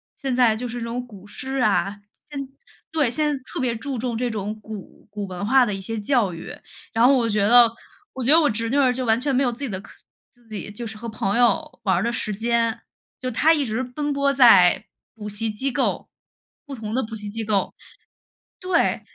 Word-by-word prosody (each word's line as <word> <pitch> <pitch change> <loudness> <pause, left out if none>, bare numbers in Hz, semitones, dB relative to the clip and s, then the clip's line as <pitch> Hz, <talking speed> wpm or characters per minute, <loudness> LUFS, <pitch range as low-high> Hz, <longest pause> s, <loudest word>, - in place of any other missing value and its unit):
现 270 -2 -3
在 235 -4 +4
就 245 +2 -4
是 240 - -5
那 230 - -4
种 245 +2 -4
古 205 -4 -14
诗 265 +5 -5
啊。 205 -3 +1 0.3
现 290 -2 -7
在 265 - -20 0.4
对， 290 -7 +2
现 305 +5 +1
在 285 -3 -2
特 - - -6
别 245 -3 0
注 265 +3 -4
重 235 -1 -2
这 245 0 -1
种 210 0 -4
古 210 -2 -10
古 205 -1 -5
文 185 +2 -5
化 260 +2 +5
的 210 - -2
一 195 - -5
些 225 +3 -4
教 210 -4 +1
育， 165 - -8 0.4
然 230 +2 +4
后 275 - +6
我 235 -2 +1
觉 205 -1 +2
得 240 0 +8 0.4
我 260 - -5
觉 265 - +3
得 325 - +8
我 295 - +3
侄 230 +1 -2
女 280 - +1
儿 260 -3 +4
就 255 +1 -3
完 225 +1 +3
全 275 0 0
没 270 - +3
有 245 - +1
自 235 - -10
己 280 - -3
的 190 -1 -5
课 - - -15 0.4
自 240 -2 -26
己 210 -1 -6
就 230 +2 -6
是 220 - -7
和 230 +2 -6
朋 210 0 -1
友 240 -1 +1
玩 190 -4 +2
儿 180 - +1
的 235 - 0
时 215 -2 -2
间， 230 +1 0 0.4
就 255 - -3
她 310 +8 +4
一 295 -4 0
直 225 +3 -2
奔 290 +4 -3
波 280 0 +2
在 200 -10 +6 0.3
补 210 -1 -8
习 215 +2 -2
机 265 +6 -2
构， - - -1 0.6
不 280 - -8
同 220 -2 -6
的 260 - +1
补 225 0 -6
习 210 -1 -7
机 225 +2 -4
构。 205 -2 0 0.9
对， 365 -2 +1
235 Hz, 255 characters per minute, -23 LUFS, 210-260 Hz, 0.9 s, 得